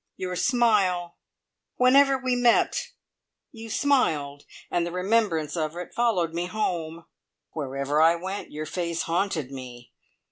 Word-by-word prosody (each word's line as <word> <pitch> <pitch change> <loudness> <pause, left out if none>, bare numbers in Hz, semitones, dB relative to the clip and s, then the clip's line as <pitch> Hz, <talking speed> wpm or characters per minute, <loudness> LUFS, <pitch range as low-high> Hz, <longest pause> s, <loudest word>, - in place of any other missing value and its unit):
Your 180 -1 -4
smile! 195 -7 +1 0.6
Whenever 270 +2 +5
we 255 -1 -1
met, 245 -1 +2 0.6
you 225 -4 -10
smiled, 155 - 0 0.3
and 175 - +1
the 170 - -4
remembrance 180 -4 0
of 155 -1 -2
it 180 - -7
followed 190 -9 +1
me 175 +1 -2
home. 170 -5 -3 0.5
Wherever 140 0 -1
I 165 +1 +5
went 190 +4 -6
your 155 +1 -5
face 170 +1 -3
haunted 165 -5 -1
me. 120 -3 -10
175 Hz, 130 wpm, -25 LUFS, 155-225 Hz, 0.6 s, Whenever